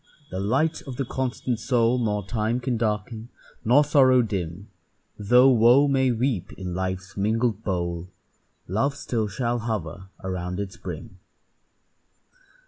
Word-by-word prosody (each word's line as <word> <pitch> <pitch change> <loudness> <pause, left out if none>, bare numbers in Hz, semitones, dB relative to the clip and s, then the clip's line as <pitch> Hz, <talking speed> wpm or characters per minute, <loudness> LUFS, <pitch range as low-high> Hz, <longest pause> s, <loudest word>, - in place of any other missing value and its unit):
the 95 - -3
light 135 +11 +1
of 130 - -5
the 135 - -2
constant 125 -2 -2
soul 120 +1 +2
Nor 105 -4 -1
time 110 +3 -1
can 125 0 -1
darken 110 +1 -2 0.3
nor 125 +6 +5
sorrow 130 -4 +5
dim; 95 -2 -4 0.5
Though 125 +6 +6
wo 125 +4 +6
may 135 -2 +2
weep 120 -5 -1
in 90 -2 -6
life's 95 +2 -4
mingled 110 +1 0
bowl, 85 -2 -2 0.6
Love 125 +10 0
still 115 -6 -2
shall 120 +4 -1
hover 100 -5 -4 0.2
around 90 0 -3
its 100 -2 -5
brim. 90 0 -8
110 Hz, 135 wpm, -25 LUFS, 95-125 Hz, 0.6 s, Though